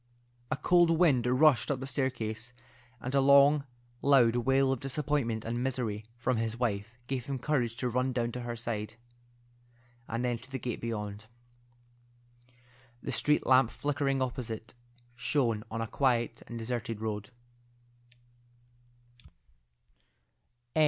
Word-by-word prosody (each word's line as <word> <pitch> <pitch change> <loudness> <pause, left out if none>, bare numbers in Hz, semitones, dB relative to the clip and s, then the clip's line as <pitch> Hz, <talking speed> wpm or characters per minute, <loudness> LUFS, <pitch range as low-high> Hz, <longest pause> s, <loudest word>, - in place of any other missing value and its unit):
A - - -1
cold 175 +3 +4
wind 155 -8 +3
rushed 125 -3 +4
up 140 -3 0
the 135 - -5
staircase, 120 -4 -2 0.5
and 125 +4 -5
a 140 - +4
long 140 +1 +6 0.4
loud 125 -5 +5
wail 135 +2 +3
of 135 - -1
disappointment 135 -5 -1
and 120 +2 -2
misery 115 -5 -2
from 120 +1 0
his 115 0 -2
wife 115 -1 -2
gave 130 -1 -3
him 140 -1 -2
courage 125 -4 0
to 125 - -1
run 125 +2 0
down 120 -1 -1
to 125 - -5
her 120 -1 -4
side, 110 -2 -4 1.1
and 115 +2 -2
then 120 -2 -1
to 130 +3 -16
the 135 - -3
gate 120 -2 -4
beyond. 105 -2 -4 1.8
The - - -3
street 150 0 +2
lamp 130 -2 +5
flickering 135 -1 0
opposite 115 -3 -5 0.4
shone 125 -4 0
on 115 0 -3
a 115 - -2
quiet 120 -2 0
and 120 - -6
deserted 115 -1 -3
road. 105 -2 -4
125 Hz, 130 wpm, -30 LUFS, 115-135 Hz, 1.8 s, long